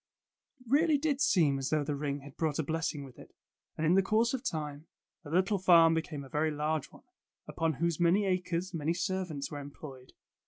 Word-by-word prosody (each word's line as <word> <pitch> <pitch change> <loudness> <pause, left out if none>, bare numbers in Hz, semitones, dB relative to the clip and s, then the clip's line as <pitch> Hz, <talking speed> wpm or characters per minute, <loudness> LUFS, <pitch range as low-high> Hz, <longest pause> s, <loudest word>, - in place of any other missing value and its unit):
It - - -20
really 300 +4 +3
did 285 -1 -1
seem 150 - +3
as 135 - -2
though 155 -1 +1
the 145 +1 -2
ring 140 0 -3
had 140 0 -13
brought 155 -3 -1
a 160 - 0
blessing 160 -1 -2
with 130 -3 -13
it, - - -15 0.4
and 160 - -1
in 165 - +4
the 195 - +5
course 220 +5 +1
of 260 -1 -3
time, 150 - -4 0.4
the 145 - -10
little 190 +5 +1
farm 170 -3 +6
became 160 -3 -3
a - - -11
very 150 +3 0
large 150 0 -2
one, - - -17 0.4
upon 165 0 -1
whose 170 +2 -1
many 175 +4 +3
acres 185 -1 -1
many 165 +1 -1
servants 180 -5 -3
were 145 - -5
employed. 140 -2 -11
160 Hz, 205 wpm, -31 LUFS, 145-185 Hz, 0.4 s, farm